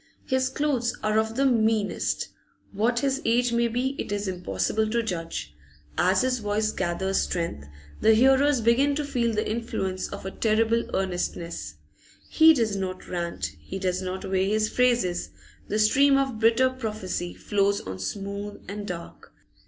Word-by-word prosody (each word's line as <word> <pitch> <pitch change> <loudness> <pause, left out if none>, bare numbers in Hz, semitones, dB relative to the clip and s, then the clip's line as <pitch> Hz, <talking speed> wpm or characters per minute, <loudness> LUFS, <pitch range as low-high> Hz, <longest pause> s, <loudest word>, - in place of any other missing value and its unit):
His 260 0 +1
clothes 265 -4 -1
are 215 0 +2
of 220 0 -1
the 275 +2 +2
meanest; 220 -4 +1 0.4
what 230 +4 +1
his 275 0 0
age 235 +1 +2
may 235 0 +2
be 245 +3 0
it - - -4
is 205 0 -2
impossible 190 +4 -1
to 235 +1 0
judge. 165 - -4 0.4
As 185 +5 +3
his 255 -1 +1
voice 215 0 0
gathers 190 +2 -1
strength, 165 - -3 0.3
the 220 0 +5
hearers 265 +2 +4
begin 260 +6 +3
to 295 0 -2
feel 240 -4 0
the 215 -1 -1
influence 195 -5 -2
of - - -8
a 190 - -3
terrible 225 +2 +1
earnestness. 170 - -3 0.5
He 320 0 +6
does 225 -6 0
not 185 -1 -4
rant, 170 - -3
he 75 - -7
does 185 -1 -1
not 185 0 -4
weigh 190 0 +1
his 215 0 +1
phrases; 240 -8 +1 0.4
the 210 - -1
stream 275 +6 +5
of 270 -5 -1
bitter 230 +3 +4
prophecy 210 -8 -4
flows 200 -1 +1
on 95 0 -7
smooth 200 - -5
and 205 +1 -6
dark. 170 -2 -8
215 Hz, 160 wpm, -26 LUFS, 190-240 Hz, 0.5 s, He